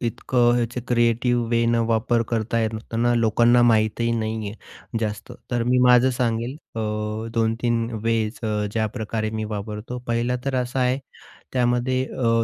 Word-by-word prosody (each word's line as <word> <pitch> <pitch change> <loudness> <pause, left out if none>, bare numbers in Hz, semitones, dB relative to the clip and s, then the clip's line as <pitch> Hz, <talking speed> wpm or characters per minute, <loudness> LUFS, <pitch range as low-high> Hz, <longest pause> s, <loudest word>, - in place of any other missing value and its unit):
इतकं 120 +1 +1
याचे 120 +1 -2
क्रिएटिव्ह 120 0 +2
वेनं 115 0 +2
वापर 115 +1 +1
करता 115 0 0
येते 110 0 -3
ना. 120 +1 +2
लोकांना 120 +1 +4
माहीतही 115 0 +2
नाही 110 -1 -3
आहे 110 +2 -9
जास्त. 105 -2 -4 0.2
तर 120 -2 0
मी 125 +1 +2
माझं 125 +1 +5
सांगेल, 120 +1 -1 0.2
अ, 115 - -3 0.5
2-3 115 0 0
वेज 115 -1 0 0.3
ज्याप्रकारे 110 0 -2
मी 110 0 -3
वापरतो, 105 +3 -5
पहिला 120 +1 0
तर 135 -1 -1
असा 125 +2 -3
आहे 125 +1 +2 0.6
त्यामध्ये 125 +1 +1
अ, 115 -2 +2
115 Hz, 140 wpm, -23 LUFS, 110-120 Hz, 0.6 s, माझं